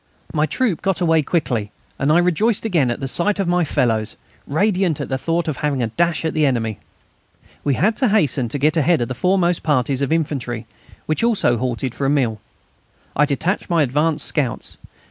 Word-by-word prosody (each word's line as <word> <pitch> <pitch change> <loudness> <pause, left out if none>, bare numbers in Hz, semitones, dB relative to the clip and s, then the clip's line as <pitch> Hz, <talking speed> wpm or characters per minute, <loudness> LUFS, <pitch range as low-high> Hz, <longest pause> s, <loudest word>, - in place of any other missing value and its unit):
My 155 0 +1
troop 230 -6 0
got 195 -3 0
away 165 -3 +3
quickly, 125 - -1 0.3
and 140 +2 +2
I 160 - +5
rejoiced 185 +6 +1
again 165 - +2
at 120 - -2
the 135 - -2
sight 200 +9 0
of 195 - 0
my 175 0 +2
fellows, 115 -7 0 0.3
radiant 185 0 +1
at - - -4
the 130 - 0
thought 165 +2 -1
of 150 -4 -2
having 140 -4 -1
a 115 - -1
dash 170 +5 0
at 160 - -1
the 155 - +1
enemy. 115 -6 0 0.8
We 140 -2 +1
had 215 - +1
to 260 - +2
hasten 155 - +2
and 145 - -2
get 155 +4 +2
ahead 160 -1 +3
of 120 - -2
the - - -2
foremost 180 +5 +1
parties 135 -2 +1
of 140 - -1
infantry, 135 -8 -2 0.4
which 155 +7 -1
also 215 - +2
halted 125 +1 -2
now - - -15
for 140 - -1
a - - +2
meal. 125 -7 0 0.7
I 150 - +4
detached 165 +9 -1
my 170 -3 +3
advance 150 +4 0
scouts. 135 -7 -2
150 Hz, 205 wpm, -20 LUFS, 130-175 Hz, 0.8 s, I